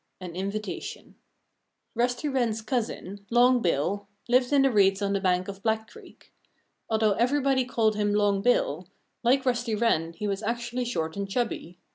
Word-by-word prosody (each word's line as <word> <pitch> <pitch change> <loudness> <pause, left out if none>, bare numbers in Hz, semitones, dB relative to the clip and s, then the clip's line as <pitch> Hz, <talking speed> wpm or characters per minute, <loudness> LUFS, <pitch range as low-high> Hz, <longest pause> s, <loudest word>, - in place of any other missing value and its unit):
XX 185 -1 -7
AN 170 - -11
INVITATION 200 +3 -5 0.8
Rusty 245 +4 0
Wren's 240 -5 0
cousin, 215 -4 -3
Long 245 +1 +4
Bill, 185 +4 0 0.2
lived 250 +1 +3
in 280 -1 +5
the 270 - +3
reeds 195 -3 +4
on 200 -1 0
the 200 - 0
bank 185 -1 +1
of 200 0 -7
Black 220 0 0
Creek. - - -16 0.6
Although 220 -1 +2
everybody 265 +3 +2
called 225 -3 +1
him 205 0 +1
"Long 205 -1 +2
Bill," 185 -7 +1 0.3
like 260 +3 +2
Rusty 240 -3 0
Wren 170 -7 +1
he 210 +5 -4
was 200 0 -2
actually 235 +2 -2
short 160 -9 -2
and 200 0 -4
chubby. 195 -6 -3
220 Hz, 165 wpm, -27 LUFS, 195-245 Hz, 0.8 s, in